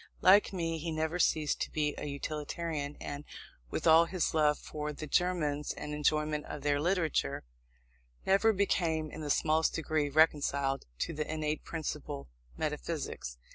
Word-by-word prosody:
Like 200 +3 +6
me, 165 -3 -2
he 165 +1 -3
never 160 +2 -1
ceased 155 -3 +2
to - - -1
be 150 -1 0
a - - -5
utilitarian, 150 +1 -4
and, 145 0 -5 0.5
with - - -3
all 165 +1 +7
his 180 0 -1
love 150 -2 +3
for 150 0 -5
the 150 +1 -6
Germans 150 -3 0
and 150 - -6
enjoyment 150 0 +1
of 150 - -6
their 145 0 +2
literature, 175 -2 0 0.8
never 200 +4 +4
became 165 -6 0
in 155 - -7
the 150 - -4
smallest 160 +2 +2
degree 155 -2 0
reconciled 140 - +2
to - - -1
the 150 0 -3
innate 155 -1 -2
principle 150 - -5 0.3
metaphysics. - - -3
155 Hz, 150 wpm, -32 LUFS, 150-165 Hz, 0.8 s, all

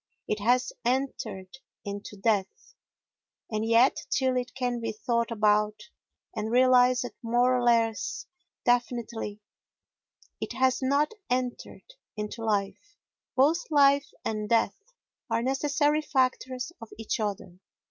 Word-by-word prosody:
It 210 - -1
has 245 +4 +2
entered 235 -5 -2 0.3
into 205 +1 -6
death. 205 - -1 0.8
And 215 0 -1
yet 230 +3 +4
till 260 -2 +1
it 250 0 -3
can 245 -2 -1
be 230 -1 -3
thought 235 +1 -1
about 210 -1 +2 0.6
and 215 0 -2
realised 250 0 +4 0.2
more 245 +2 +2
or 250 - 0
less 230 -2 +1 0.4
definitely 235 -3 -1 1.0
it - - -4
has 260 +1 +2
not 280 +3 +2 0.2
entered 250 -1 -3 0.3
into 210 +2 -5
life. 215 - -2 0.4
Both 305 +7 +2
life 280 -1 +4 0.2
and 215 -1 -2
death 230 - +1 0.5
are 230 - 0
necessary 290 +3 +1
factors 260 -1 -1
of 230 - -9
each 225 +1 -3
other. 195 -4 -4
240 Hz, 115 wpm, -27 LUFS, 215-260 Hz, 1.0 s, yet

